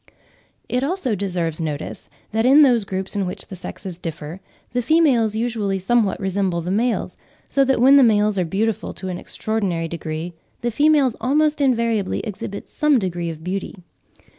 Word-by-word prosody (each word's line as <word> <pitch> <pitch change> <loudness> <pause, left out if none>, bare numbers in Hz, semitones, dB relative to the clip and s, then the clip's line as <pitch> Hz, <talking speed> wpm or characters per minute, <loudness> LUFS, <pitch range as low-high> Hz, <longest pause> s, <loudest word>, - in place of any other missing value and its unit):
It 250 +1 0
also 290 - -1
deserves 175 -5 -2
notice 155 -2 -5 0.2
that 225 +1 +1
in 275 +5 +7
those 240 -6 +3
groups 190 +1 -4
in 195 -2 0
which 190 +2 -6
the 190 - -9
sexes 180 0 -7
differ, 165 0 -6 0.3
the 245 - +1
females 245 -6 +3
usually 220 -4 -1
somewhat 210 +1 +1
resemble 190 -2 -1
the 175 +2 -3
males, 230 +4 0 0.3
so 275 - +2
that 265 -2 +2
when 270 +3 +7
the - - +7
males 210 -3 +3
are - - +2
beautiful 210 +6 -2
to 190 - -6
an 180 -1 -4
extraordinary 195 -7 -2
degree, 165 +1 -5 0.3
the 240 - -1
females 290 -1 +3
almost 300 +3 +2
invariably 230 -6 +1
exhibit 200 -2 -6
some 300 -2 +2
degree 175 -5 -2
of 160 -1 -8
beauty. 190 +4 -4
210 Hz, 165 wpm, -21 LUFS, 180-245 Hz, 0.3 s, in